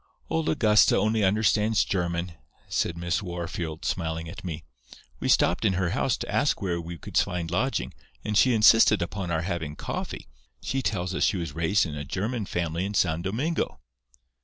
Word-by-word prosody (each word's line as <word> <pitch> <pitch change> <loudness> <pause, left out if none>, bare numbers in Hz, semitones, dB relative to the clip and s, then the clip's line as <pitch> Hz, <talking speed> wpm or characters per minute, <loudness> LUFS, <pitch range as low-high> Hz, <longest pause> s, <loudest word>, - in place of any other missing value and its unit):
"'Old 160 -1 0
Augusta 105 -8 +4
only 110 +1 +1
understands 105 +2 +2
German,' 85 -1 -2 0.4
said 85 - -1
Miss 85 +1 -1
Wahrfield, 85 -3 -5
smiling 80 -2 -2
at 85 - -9
me. 80 -3 -5 0.6
'We - - -2
stopped - - +3
in 95 - +3
her 90 -2 0
house - - 0
to - - -5
ask - - +2
where 85 -3 -2
we 85 +1 -7
could - - -10
find 90 -4 0
lodging, 130 +10 -1 0.3
and 105 - -2
she 125 +3 +5
insisted 105 -2 +6
upon 95 +1 -4
our 80 -1 0
having 85 -4 -3
coffee. - - -5 0.3
She 135 - -2
tells 95 -6 -2
us - - 0
she 100 - +2
was 85 -5 -4
raised 85 +6 +2
in 80 - -5
a 75 -1 -4
German 105 - -3
family 85 0 -2
in 100 +2 -3
San 85 -3 +2
Domingo. 125 - -2
90 Hz, 180 wpm, -26 LUFS, 85-105 Hz, 0.6 s, insisted